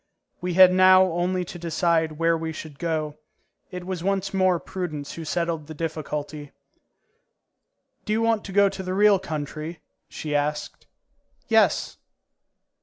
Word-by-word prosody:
We 180 -1 -2
had 185 0 +8
now 185 0 +7
only 180 +2 -1
to 175 - -9
decide 165 -1 0
where 165 +2 +1
we 160 0 -3
should 155 -2 -9
go. 155 -3 -2 0.5
It 180 -2 -7
was 185 -2 -4
once 195 0 -1
more 185 -2 +2
Prudence 155 -7 -5
who 165 - -7
settled 165 -1 -2
the 155 - -8
difficulty. 150 -2 -5 1.5
"Do - - -3
you 225 +1 +1
want 225 -2 +1
to 195 - -7
go 200 +1 +5
to 195 -1 -5
the 185 0 -3
real 205 -1 +5
country?" 155 -1 -6 0.3
she 150 -1 -5
asked. 150 +1 -2 0.6
"Yes." - - +2
170 Hz, 145 wpm, -24 LUFS, 155-185 Hz, 1.5 s, had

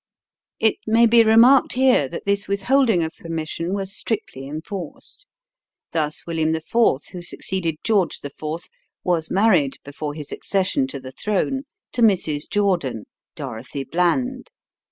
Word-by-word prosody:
It 220 -1 +3
may 225 +2 +5
be 230 0 +6
remarked 230 +4 +6
here 255 - +4
that - - -7
this 200 0 0
withholding 200 0 +2
of 160 - -4
permission 165 +1 -4
was 195 0 -3
strictly 165 - -4
enforced. 165 - -8 0.6
Thus 155 -2 -2
William 160 -1 0
IV., 160 - -5 0.5
who 180 -1 -7
succeeded 175 -1 -3
George 200 -7 +1
IV., 145 -1 -6 0.7
was 165 -3 0
married, 185 -9 +3
before 145 +1 -5
his 150 -2 -8
accession 185 -9 0
to 135 +1 -6
the 130 0 -9
throne, 215 - -1 0.3
to 245 - -1
Mrs. 165 -9 +2
Jordan 175 - 0 0.3
(Dorothy 130 +5 -6
Bland). 245 - 0
180 Hz, 135 wpm, -22 LUFS, 155-220 Hz, 0.7 s, be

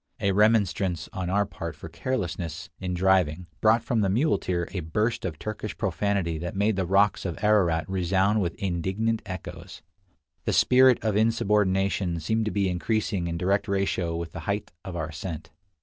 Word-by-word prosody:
A 100 - +1
remonstrance 95 -5 +2
on 95 -4 -3
our 100 +2 +2
part - - -6
for - - -9
carelessness 90 -9 -4
in 90 -1 -3
driving 90 -2 +2 0.2
brought 110 +1 +4
from 115 -2 0
the 100 - +2
muleteer 95 - +1
a 95 - -3
burst 105 +9 -1
of 80 -4 -3
Turkish 110 +3 -5
profanity 95 -3 -1
that 85 +2 -5
made 105 +2 +2
the 95 -2 -1
rocks 100 +3 +3
of 90 -3 -3
Ararat 85 -7 +3
resound 95 +3 +1
with 85 -3 -2
indignant 95 +5 -1
echoes. 90 -2 -8 0.6
The - - 0
spirit 130 -1 +6
of 110 -2 +1
insubordination 100 -5 +1
seemed 110 +5 0
to 110 - -1
be 100 -2 +1
increasing 95 0 -1
in 85 0 -3
direct 100 +3 +1
ratio 95 -4 0
with 85 -1 -4
the - - -7
height 100 +1 -2
of 95 - -7
our 80 -2 -3
ascent. 80 +1 -6
95 Hz, 170 wpm, -26 LUFS, 85-105 Hz, 0.6 s, spirit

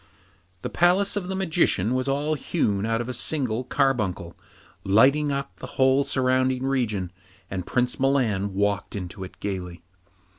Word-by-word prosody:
The - - -2
palace 185 +4 +3
of 195 -3 -2
the 190 - -3
Magician 160 - +1
was 130 +1 -1
all 145 +3 0
hewn 110 - -1
out 115 +1 0
of 120 - -5
a 130 - -3
single 125 -2 -1
carbuncle, 110 -11 0 0.5
lighting 135 +9 +4
up 140 0 -4
the - - -8
whole 130 +1 +4
surrounding 130 -1 +1
region, 110 -9 -1 0.4
and 95 -2 -4
Prince 125 0 0
Milan 115 -8 +1
walked 100 +1 -1
into 95 0 -6
it 95 - -11
gaily. 90 -4 -5
125 Hz, 150 wpm, -25 LUFS, 100-140 Hz, 0.5 s, lighting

